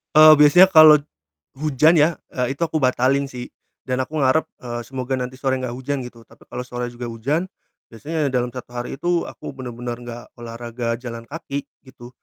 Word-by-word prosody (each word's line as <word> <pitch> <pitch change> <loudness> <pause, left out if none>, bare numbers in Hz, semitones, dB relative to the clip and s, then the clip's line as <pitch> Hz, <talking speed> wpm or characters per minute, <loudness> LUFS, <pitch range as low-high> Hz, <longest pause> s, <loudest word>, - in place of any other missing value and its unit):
Eee, 155 0 +10
biasanya 150 +5 +7
kalau 155 -1 +9
t 145 - -12 0.6
hujan 155 +2 +4
ya, 155 +3 +3 0.2
eee, 130 +2 -2
itu - - -16
aku 155 -1 -2
batalin 130 +2 +1
sih, 125 -1 -7 0.4
dan 130 0 -1
aku 155 +4 -5
ngarep, 140 +3 +2
eee, 120 -1 -6
semoga 130 +1 -5
nanti 130 0 -3
sore 130 -1 -1
enggak 125 -2 -4
hujan 135 +1 -3
gitu, 120 -2 -11
tapi - - -21
kalo 125 - -6
sore 125 0 -5
juga 120 0 -8
hujan 135 +10 -2 0.5
biasanya 150 +5 -2
dalam 125 -1 0
1 125 -1 -8
hari 120 +2 -5
itu 175 -1 0
aku - - -9
bener-bener 120 -2 -6
enggak 120 0 -8
olahraga 115 0 -5
jalan 115 -2 -8
kaki 145 -3 -5 0.2
gitu. 125 -2 -13
130 Hz, 185 wpm, -21 LUFS, 120-145 Hz, 0.6 s, Eee